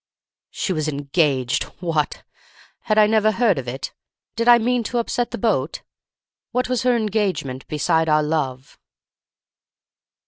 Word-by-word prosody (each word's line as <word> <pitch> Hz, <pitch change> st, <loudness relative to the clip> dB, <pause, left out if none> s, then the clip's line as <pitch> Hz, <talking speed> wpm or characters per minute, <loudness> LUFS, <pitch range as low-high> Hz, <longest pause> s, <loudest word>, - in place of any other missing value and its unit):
"She 190 Hz, -, -2 dB
was 155 Hz, -2 st, -2 dB
engaged—what! 145 Hz, +2 st, -1 dB, 0.6 s
Had 215 Hz, -1 st, +1 dB
I 215 Hz, -, +7 dB
never 215 Hz, 0 st, +3 dB
heard 215 Hz, -, +2 dB
of 125 Hz, -, -7 dB
it? 130 Hz, +3 st, -5 dB, 0.4 s
Did 230 Hz, +1 st, -1 dB
I 240 Hz, 0 st, +9 dB
mean 245 Hz, +1 st, +1 dB
to 245 Hz, -, -2 dB
upset 240 Hz, +1 st, -1 dB
the 240 Hz, -, -5 dB
boat? 180 Hz, -, -1 dB, 0.7 s
What 250 Hz, +1 st, -1 dB
was 250 Hz, -1 st, 0 dB
her 250 Hz, -1 st, +3 dB
engagement 200 Hz, -, -1 dB
beside 160 Hz, +1 st, +1 dB
our 155 Hz, 0 st, +3 dB
love? 140 Hz, -4 st, -3 dB
180 Hz, 135 wpm, -21 LUFS, 145-230 Hz, 0.7 s, I